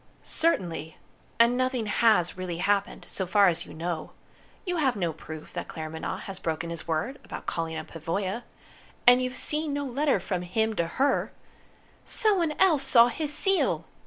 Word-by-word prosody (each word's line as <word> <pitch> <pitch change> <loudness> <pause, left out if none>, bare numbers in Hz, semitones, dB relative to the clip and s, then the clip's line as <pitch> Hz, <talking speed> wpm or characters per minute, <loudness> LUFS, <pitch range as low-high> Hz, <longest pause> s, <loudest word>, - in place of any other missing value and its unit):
"Certainly. 170 - 0 0.4
And 235 +1 +5
nothing 255 -2 0
has 210 -4 +3
really 185 -2 -4
happened, 200 +2 0
so 190 - -3
far 200 +1 +5
as 170 -1 -3
you - - -10
know. 165 0 -4 0.5
You 360 -2 -1
have 270 -6 +2
no 175 -5 -1
proof 155 0 -10
that - - -4
Claremanagh 160 +4 -5
has 195 -2 -6
broken 165 +1 -3
his 170 0 -6
word 165 - -2
about - - -8
calling 165 -1 -2
on - - -5
Pavoya. 185 +7 -3 0.6
And 245 +1 +7
you've 255 0 -3
seen 300 -1 -1
no 285 0 -2
letter 280 +3 +1
from 185 -3 -3
him 220 +5 0
to 170 - +1
her 275 0 +2 0.4
" - - -32
"Someone 365 -8 +1
else 330 -5 +4
saw 245 -3 +6
his 295 +4 -2
seal!" 390 +5 +2
205 Hz, 170 wpm, -27 LUFS, 170-270 Hz, 0.6 s, And